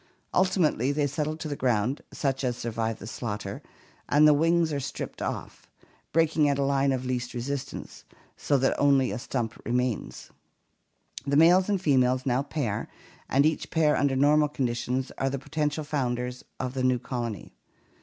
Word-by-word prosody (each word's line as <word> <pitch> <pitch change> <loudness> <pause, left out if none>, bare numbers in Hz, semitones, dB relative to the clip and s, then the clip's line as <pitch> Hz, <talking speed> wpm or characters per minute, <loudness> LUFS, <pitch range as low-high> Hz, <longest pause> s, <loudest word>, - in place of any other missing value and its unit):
Ultimately 165 - +2
they 145 0 +1
settle 150 +2 -2
to 160 - -5
the 145 - -3
ground, 125 +1 0
such 135 -2 -1
as 125 -2 -1
survive 115 -1 -2
the - - -10
slaughter, 105 -3 -5 0.5
and 150 +1 +6
the 150 - +7
wings 165 +1 +2
are 140 - -1
stripped 135 - -6
off, - - -5 0.4
breaking 160 -2 +3
at 140 - +1
a 140 - +1
line 140 0 +2
of 130 -1 -2
least 125 -1 -3
resistance, 135 +3 -5 0.3
so 140 - +1
that 135 0 +2
only 140 -2 +4
a - - -3
stump 120 -2 -3
remains 125 -1 -2 0.9
behind. 140 +2 -5
The 140 - +4
males 180 +5 +6
and 200 -2 +2
females 130 -6 +2
now 130 0 +2
pair 140 -7 -3 0.4
and 140 +2 +4
each 155 0 0
pair 155 -2 +3
under 140 -2 +1
normal 150 +2 +4
condi 130 -5 -1
tions 130 +2 -2
are 135 - +1
the 140 - -2
potential 150 +2 -2
founders 125 -4 -2 0.2
of 130 0 -3
a 130 - -1
new 130 0 +3
colony. 120 - -5
135 Hz, 175 wpm, -27 LUFS, 125-150 Hz, 0.9 s, the